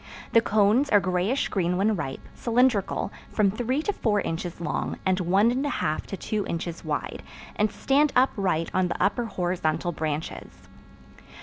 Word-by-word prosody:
The 230 Hz, -, +6 dB
cones 215 Hz, +6 st, +3 dB
are 205 Hz, -, +6 dB
grayish 185 Hz, +8 st, 0 dB
green 180 Hz, -2 st, 0 dB
when 210 Hz, +3 st, +2 dB
ripe, 135 Hz, -7 st, -5 dB
cylindrical, 235 Hz, -5 st, +1 dB, 0.2 s
from 205 Hz, -3 st, +2 dB
three 250 Hz, +7 st, -1 dB
to 410 Hz, -, 0 dB
four 210 Hz, -, +1 dB
inches 170 Hz, -1 st, -4 dB
long, 170 Hz, -3 st, -2 dB
and 190 Hz, 0 st, +2 dB
one 195 Hz, +6 st, +3 dB
and 260 Hz, +3 st, -1 dB
a 290 Hz, -, 0 dB
half 155 Hz, -, -2 dB
to 195 Hz, -, -5 dB
two 210 Hz, +3 st, -2 dB
inches 170 Hz, 0 st, -4 dB
wide, -, -, -3 dB, 0.3 s
and 210 Hz, 0 st, +1 dB
stand 285 Hz, +2 st, +2 dB
upright 195 Hz, -10 st, +2 dB
on 185 Hz, -1 st, +2 dB
the -, -, -4 dB
upper 235 Hz, +4 st, +1 dB
horizontal 175 Hz, -4 st, -1 dB
branches. 155 Hz, -1 st, -5 dB
200 Hz, 165 wpm, -26 LUFS, 175-230 Hz, 0.3 s, The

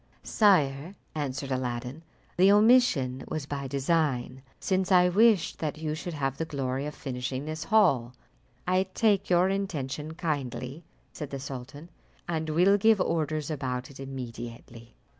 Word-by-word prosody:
"Sire," 170 Hz, -5 st, +2 dB, 0.2 s
answered 140 Hz, -2 st, -4 dB
Aladdin, 125 Hz, +2 st, -3 dB, 0.3 s
"the 190 Hz, +2 st, +5 dB
omission 205 Hz, -, +4 dB
was 155 Hz, -3 st, -4 dB
by 140 Hz, -1 st, -4 dB
design, 135 Hz, -2 st, 0 dB, 0.2 s
since 190 Hz, 0 st, 0 dB
I 180 Hz, -1 st, +6 dB
wished 210 Hz, -1 st, +3 dB
that 155 Hz, -1 st, -3 dB
you 155 Hz, -1 st, -3 dB
should 165 Hz, +2 st, -5 dB
have 135 Hz, -2 st, -2 dB
the 165 Hz, -, -2 dB
glory 135 Hz, -2 st, -3 dB
of 150 Hz, -, -7 dB
finishing 130 Hz, 0 st, -4 dB
this 155 Hz, 0 st, -5 dB
hall." 135 Hz, -, +3 dB, 0.5 s
"I 185 Hz, +1 st, +2 dB
take 210 Hz, -4 st, +2 dB
your 180 Hz, +1 st, +4 dB
intention 160 Hz, -6 st, -3 dB
kindly," 145 Hz, -3 st, -4 dB, 0.3 s
said 150 Hz, -3 st, -6 dB
the 140 Hz, -, -5 dB
sultan, 140 Hz, +4 st, -8 dB, 0.4 s
"and 160 Hz, -2 st, -2 dB
will 180 Hz, +6 st, +4 dB
give 220 Hz, 0 st, +4 dB
orders 155 Hz, -3 st, -1 dB
about 130 Hz, -3 st, -3 dB
it 135 Hz, -, -14 dB
immediately." 120 Hz, -3 st, -8 dB
150 Hz, 140 wpm, -28 LUFS, 130-180 Hz, 0.5 s, I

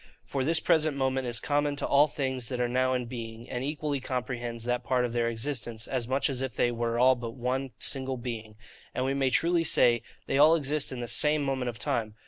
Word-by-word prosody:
For 135 Hz, -2 st, -2 dB
this 160 Hz, +4 st, +3 dB
present 155 Hz, -3 st, +2 dB
moment 130 Hz, -1 st, 0 dB
is 120 Hz, -2 st, -1 dB
common 145 Hz, +2 st, 0 dB
to -, -, -3 dB
all 145 Hz, +2 st, +5 dB
things 130 Hz, -4 st, -2 dB
that 125 Hz, -2 st, -3 dB
are 125 Hz, -, +2 dB
now 130 Hz, +1 st, +1 dB
in 125 Hz, -1 st, -2 dB
being, 115 Hz, -1 st, -7 dB
and 125 Hz, +1 st, -4 dB
equally 145 Hz, 0 st, -2 dB
comprehends 120 Hz, -3 st, -4 dB
that 125 Hz, +1 st, -1 dB
part 125 Hz, 0 st, +1 dB
of 120 Hz, -, -4 dB
their 120 Hz, -1 st, +1 dB
existence, 115 Hz, -2 st, -2 dB
as 125 Hz, -3 st, -2 dB
much 135 Hz, +2 st, +1 dB
as 135 Hz, -2 st, -1 dB
if 130 Hz, -2 st, -3 dB
they 120 Hz, -, +2 dB
were 115 Hz, 0 st, -1 dB
all 130 Hz, +2 st, +6 dB
but 120 Hz, -2 st, -6 dB
one 130 Hz, +2 st, -2 dB
single 130 Hz, -1 st, -1 dB
being; 115 Hz, -3 st, -6 dB, 0.4 s
and 130 Hz, -, 0 dB
we 135 Hz, -, 0 dB
may 135 Hz, -1 st, +1 dB
truly 170 Hz, +5 st, +2 dB
say, 120 Hz, -7 st, +4 dB, 0.2 s
they 135 Hz, -, 0 dB
all 155 Hz, +3 st, +7 dB
exist 150 Hz, -2 st, 0 dB
in 125 Hz, -2 st, -5 dB
the 120 Hz, -, -4 dB
SAME 150 Hz, +5 st, +3 dB
moment 130 Hz, -2 st, -1 dB
of 115 Hz, -, -7 dB
time. 110 Hz, 0 st, -2 dB
130 Hz, 230 wpm, -28 LUFS, 120-140 Hz, 0.4 s, all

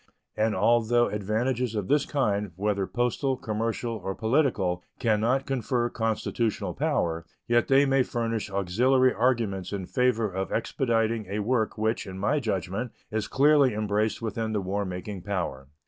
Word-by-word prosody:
And 110 Hz, 0 st, +1 dB
although 120 Hz, +3 st, +3 dB
advantages 110 Hz, +4 st, -1 dB
of 105 Hz, -3 st, -2 dB
this 145 Hz, 0 st, +2 dB
kind, 105 Hz, -, 0 dB
whether 100 Hz, 0 st, -1 dB
postal, 125 Hz, +2 st, 0 dB
commercial, 115 Hz, +1 st, -2 dB
or 95 Hz, 0 st, -3 dB
political, 110 Hz, -, +1 dB
can 110 Hz, -4 st, +1 dB
not 130 Hz, +4 st, +1 dB
confer 125 Hz, -2 st, 0 dB
constitutional 115 Hz, 0 st, -1 dB
power, 80 Hz, -1 st, 0 dB, 0.2 s
yet 120 Hz, 0 st, +3 dB
they 135 Hz, +1 st, +5 dB
may 135 Hz, -1 st, +3 dB
furnish 115 Hz, -4 st, -2 dB
auxiliary 125 Hz, +8 st, +2 dB
arguments 110 Hz, -5 st, 0 dB
in 100 Hz, -2 st, -3 dB
favor 120 Hz, 0 st, +1 dB
of 95 Hz, 0 st, -4 dB
expediting 115 Hz, -3 st, 0 dB
a 100 Hz, +2 st, -3 dB
work 110 Hz, +1 st, 0 dB
which, 110 Hz, 0 st, -1 dB
in 95 Hz, 0 st, -7 dB
my 140 Hz, +10 st, +1 dB
judgment, 105 Hz, -, -2 dB, 0.2 s
is 110 Hz, -1 st, -1 dB
clearly 140 Hz, -3 st, +4 dB
embraced 105 Hz, +1 st, 0 dB
within 110 Hz, 0 st, -2 dB
the 105 Hz, -, 0 dB
war 100 Hz, +2 st, -2 dB
making 95 Hz, +1 st, -5 dB
power. 85 Hz, -9 st, -3 dB
110 Hz, 150 wpm, -27 LUFS, 100-125 Hz, 0.2 s, they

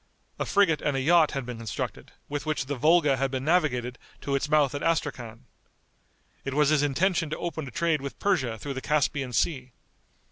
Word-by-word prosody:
A -, -, -2 dB
frigate 195 Hz, -7 st, +3 dB
and 145 Hz, -2 st, 0 dB
a -, -, +1 dB
yacht 160 Hz, +3 st, +4 dB
had 135 Hz, -2 st, -3 dB
been 125 Hz, -1 st, -6 dB
constructed, 110 Hz, -4 st, -5 dB, 0.2 s
with 145 Hz, 0 st, -4 dB
which 155 Hz, -3 st, -2 dB
the 145 Hz, -, -3 dB
Volga 150 Hz, 0 st, +3 dB
had 135 Hz, +1 st, 0 dB
been 130 Hz, 0 st, -4 dB
navigated 130 Hz, -8 st, +1 dB, 0.2 s
to 140 Hz, -, -3 dB
its 140 Hz, +1 st, 0 dB
mouth 150 Hz, -3 st, +3 dB
at 145 Hz, -, -4 dB
Astrachan. 125 Hz, -7 st, -2 dB, 1.0 s
It 135 Hz, 0 st, -4 dB
was 150 Hz, -1 st, +4 dB
his 155 Hz, -2 st, +3 dB
intention 165 Hz, +3 st, +1 dB
to 155 Hz, -, -3 dB
open 160 Hz, -4 st, -4 dB
a -, -, -6 dB
trade 160 Hz, +3 st, 0 dB
with 140 Hz, 0 st, -6 dB
Persia 130 Hz, -, 0 dB
through 140 Hz, +5 st, -5 dB
the 130 Hz, -, -5 dB
Caspian 145 Hz, -3 st, 0 dB
Sea. 130 Hz, 0 st, -1 dB
145 Hz, 200 wpm, -27 LUFS, 130-155 Hz, 1.0 s, yacht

